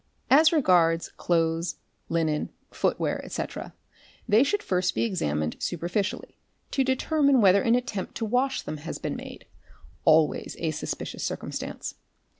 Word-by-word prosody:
As 310 +4 +7
regards 175 - +3
clothes, 165 0 0 0.3
linen, 160 -2 0 0.2
footware, - - -1
etc., - - -5 0.5
they 220 +1 +5
should 410 +9 0
first 180 -1 0
be - - +1
examined 75 - -1
superficially 175 +4 -2 0.4
to 270 - +2
determine 275 +1 +2
whether 200 -2 +6
an 230 +3 +3
attempt 245 -6 -3
to 225 - -2
wash 255 +4 0
them 155 - -5
has 150 +2 -6
been - - -4
made, - - -9 0.6
always 155 -1 +3
a 160 -2 -1
suspicious 155 - -5
circumstance. - - -4
185 Hz, 130 wpm, -26 LUFS, 165-250 Hz, 0.6 s, As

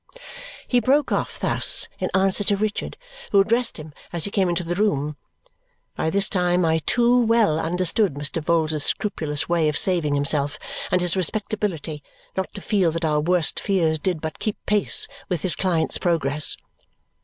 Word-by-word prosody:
He 245 - +3
broke 275 +5 +2
off - - -2
thus - - +3
in - - -2
answer 195 +1 +3
to 200 - +2
Richard, 210 +1 -3 0.3
who 200 - +5
addressed 230 +4 +1
him 155 -1 -10 0.2
as 170 -2 -1
he 200 - -4
came 190 -3 +1
into 175 0 -1
the 170 +1 -3
room. 150 -7 0 0.8
By 160 - -1
this 195 +4 +3
time 180 -2 +1
I 160 0 +2
too 245 +1 +3
well 225 -8 +2
understood 180 +1 +1
Mr. 145 +2 -3
Vholes's 155 -2 +1
scrupulous 155 -8 0
way 170 -3 +2
of 150 - -1
saving 170 -6 +3
himself 145 0 0 0.3
and 180 - +1
his 175 0 +1
respectability 190 -5 -2 0.3
not 190 - -3
to 200 - -7
feel 195 -5 +1
that 165 0 -2
our 150 -1 +1
worst 170 +1 +1
fears 165 -6 0
did 175 -1 -2
but 160 -1 -6
keep 215 - -3
pace 210 -1 +1 0.2
with 175 -5 -2
his 185 - +2
client's 175 -4 0
progress. 150 -4 +1
175 Hz, 170 wpm, -22 LUFS, 155-200 Hz, 0.8 s, who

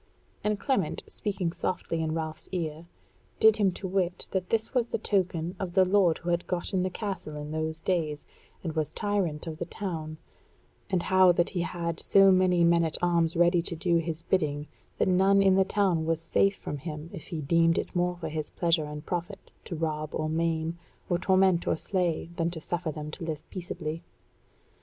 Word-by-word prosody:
And 210 -1 0
Clement, 200 - 0
speaking 190 -5 -2
softly 170 -3 -2
in 160 -1 -1
Ralph's 160 -1 -5
ear, 165 -2 -3 0.5
did 220 -1 +6
him 200 -3 +3
to 190 - -5
wit 180 -1 -1
that 185 -2 -2
this 225 +2 0
was 245 -3 +2
the - - -1
token 180 -4 0
of 185 -3 -4
the 190 0 +5
lord 185 -3 +3
who 175 - -3
had 170 0 0
gotten 180 +1 -1
the 185 - 0
castle 190 -6 -5
in 150 0 -6
those 160 0 -2
days, 155 -6 -1 0.4
and 165 -3 -3
was 155 -2 -1
tyrant 185 -5 -1
of 160 -1 -6
the - - -2
town; 160 -7 -5 0.7
and 185 -3 +1
how 185 -1 +6
that 170 0 +1
he 180 - -1
had 170 -1 -3
so 195 -1 +6
many 185 -2 +4
men 170 0 +4
at 160 -1 -1
arms 170 -2 +2
ready 175 +1 +4
to 170 0 -2
do 170 +1 +2
his 165 0 -3
bidding 150 -5 0 0.3
that - - +2
none 190 +2 +4
in 195 -1 +5
the 190 0 +5
town 185 -5 +1
was 165 -1 +1
safe 195 +4 +2
from 145 - -5
him 155 +1 -7
if - - -8
he 165 - -4
deemed 165 +3 +3
it - - -3
more 180 0 +1
for 160 -2 -5
his 155 -1 -4
pleasure 165 -3 +1
and 150 0 -7
profit 175 +3 -5
to 175 - -5
rob 155 -1 -2
or 155 - -1
maim, 165 +1 -1 0.3
or 175 - +2
torment 185 -2 +3
or - - +3
slay, 175 -3 -1
than 165 0 +1
to 170 -1 -5
suffer 160 0 -3
them 150 0 -6
to 170 - -6
live 155 -2 -5
peaceably. 165 -3 -5
170 Hz, 200 wpm, -28 LUFS, 160-185 Hz, 0.7 s, did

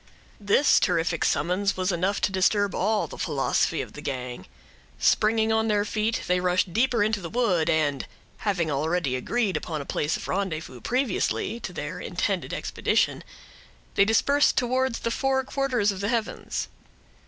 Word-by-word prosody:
This 210 +7 +4
terrific 170 -2 +1
summons 185 +5 +1
was 185 +1 0
enough 185 +3 0
to - - +1
disturb 200 +1 +2
all 210 +2 +1
the - - -10
philosophy 150 +1 0
of - - -12
the 150 - -9
gang. 125 -8 -5 0.5
Springing 220 +1 +3
on 220 0 +2
their 205 -1 +2
feet, 215 +2 -1
they 180 0 +2
rushed 180 0 +1
deeper 235 -1 +2
into 210 -1 0
the 170 - -6
wood, 195 -9 +1
and 145 -3 +1 0.3
having 175 -7 -1
already 150 -1 0
agreed 205 - -1
upon 155 0 -3
a 140 - -6
place 150 +3 -1
of - - -8
rendezvous 160 -10 -3
previously 245 -2 -1
to - - -6
their - - -5
intended - - -2
expedition, - - 0 0.7
they - - +5
dispersed 280 +7 +3
towards 255 0 0
the 230 - -1
four 265 +2 +1
quarters 255 -6 0
of 190 - -7
the 200 +1 -1
heavens. 230 -3 -2
200 Hz, 160 wpm, -26 LUFS, 165-225 Hz, 0.7 s, they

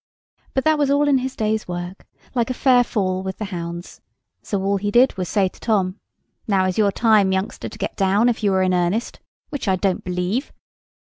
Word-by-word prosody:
But 265 - +1
that 315 -1 +3
was 285 -2 +2
all 285 +1 +3
in 275 -2 +4
his 260 +1 -4
day's 215 0 -1
work, 175 +1 -6 0.3
like 240 -2 0
a 255 - -2
fair 250 -2 +4
fall 190 -6 -1
with 190 0 -5
the 215 - -4
hounds; 170 0 -6 0.4
so 200 -2 -3
all 200 +1 +1
he 205 +1 -2
did 245 +5 +4
was 185 -2 -3
to - - -7
say 195 -2 +3
to - - -12
Tom— 195 -3 0 0.5
"Now 195 -3 +2
is 185 +2 -1
your 205 -2 +4
time, 215 -3 +3
youngster, 190 +1 -2
to - - -12
get - - -4
down, 200 +4 +3
if 230 -2 0
you 200 - +3
are 190 - +3
in 185 0 +1
earnest, 180 +6 -1 0.3
which 285 -7 -4
I 190 - +3
don't 185 0 -1
believe." 180 - -2
200 Hz, 220 wpm, -21 LUFS, 185-240 Hz, 0.5 s, in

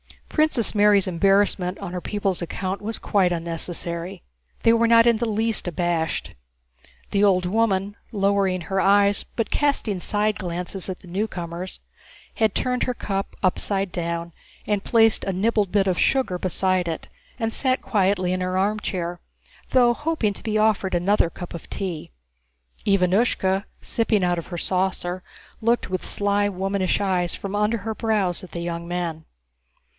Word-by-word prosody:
Princess 305 -7 +2
Mary's 205 -2 +5
embarrassment 190 0 +2
on 195 -3 -7
her 180 - -3
people's 195 -3 -1
account 185 +3 -3
was 220 +2 -3
quite 190 -3 +2
unnecessary. 170 +1 -3 0.4
They 230 - +6
were 230 0 +3
not 230 0 +6
in 235 -2 +4
the 235 0 -1
least 220 -1 +1
abashed. 170 -2 -1 0.8
The 200 0 +2
old 185 -3 +4
woman, 200 0 +1 0.2
lowering 195 -3 +1
her 190 +3 -1
eyes 200 0 +4
but 230 -2 -1
casting 275 -9 0
side 210 +2 0
glances 180 +1 -3
at 185 - -5
the - - -15
newcomers, 180 -2 -4 0.6
had 220 -2 +1
turned 250 0 0
her 250 - -1
cup 195 -3 -3
upside 195 +1 +1
down 170 0 -3 0.3
and 205 -2 0
placed 225 -1 +4
a 195 - 0
nibbled 205 0 +1
bit 200 -1 +3
of 185 -2 0
sugar 255 -10 +1
beside 185 0 0
it, 165 -1 -4 0.3
and 225 -2 -2
sat 260 -1 0
quietly 190 -3 +1
in 185 - -2
her 185 0 -1
armchair, 185 -3 -1 0.5
though 245 -2 +5
hoping 295 -7 -1
to - - -12
be 215 -1 -1
offered 210 -4 +2
another 175 0 +2
cup 175 +1 -9
of 170 - -9
tea. 180 -6 -4 0.8
Ivánushka, 195 0 +2 0.2
sipping 220 -4 +1
out 175 -1 +1
of 170 - -8
her 175 - -6
saucer, 185 0 -1 0.4
looked 230 -3 +1
with 185 - -2
sly 205 0 +1
womanish 195 0 0
eyes 185 -3 0
from 200 0 -5
under 210 +2 +1
her 220 +2 -4
brows 210 -5 0
at 185 - -11
the 170 - -4
young 170 0 -4
men. 170 -3 -3
195 Hz, 160 wpm, -23 LUFS, 180-215 Hz, 0.8 s, They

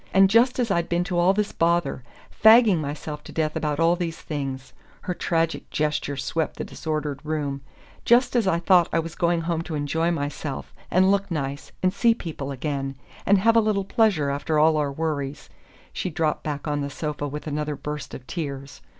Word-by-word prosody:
And 195 0 +6
just 240 +3 +4
as 240 -4 0
I'd 170 -3 0
been 175 0 +1
to 175 -1 -1
all 175 +2 +5
this 210 +1 0
bother 170 -4 +1 0.3
fagging 220 -4 +6
myself 150 0 -5
to - - -9
death 155 -1 -1
about 150 -2 -1
all 165 +1 +4
these 170 -2 -3
things 135 -3 -5
" - - -29
her 180 - -3
tragic 165 -2 -1
gesture 150 -2 -1
swept 155 +3 -2
the - - -3
disordered 150 -3 -3
room 145 -3 -2 0.4
"just 245 +1 +4
as 230 -5 +2
I 170 - +3
thought 175 0 +4
I - - +1
was 165 0 -2
going 170 -1 +1
home 165 0 -1
to 165 -1 -5
enjoy 160 +3 0
myself, 145 -3 -4 0.2
and 185 +3 +4
look 200 0 +1
nice, 140 -4 -4
and 185 0 +3
see 230 +3 +3
people 155 - -6
again, 135 0 -3 0.3
and 200 - +6
have 225 +4 +3
a 230 - +6
little 210 -3 0
pleasure 195 - +2
after 145 +2 -1
all 155 +1 +5
our 145 -2 0
worries 145 -2 -3 0.2
" - - -28
She - - -2
dropped 155 -2 -1
back 150 0 -4
on 145 -1 -1
the 140 - -3
sofa 150 0 -4
with 150 +1 -6
another 150 0 -2
burst 150 0 -6
of 125 - -10
tears. 140 -4 -6
160 Hz, 200 wpm, -24 LUFS, 145-180 Hz, 0.4 s, And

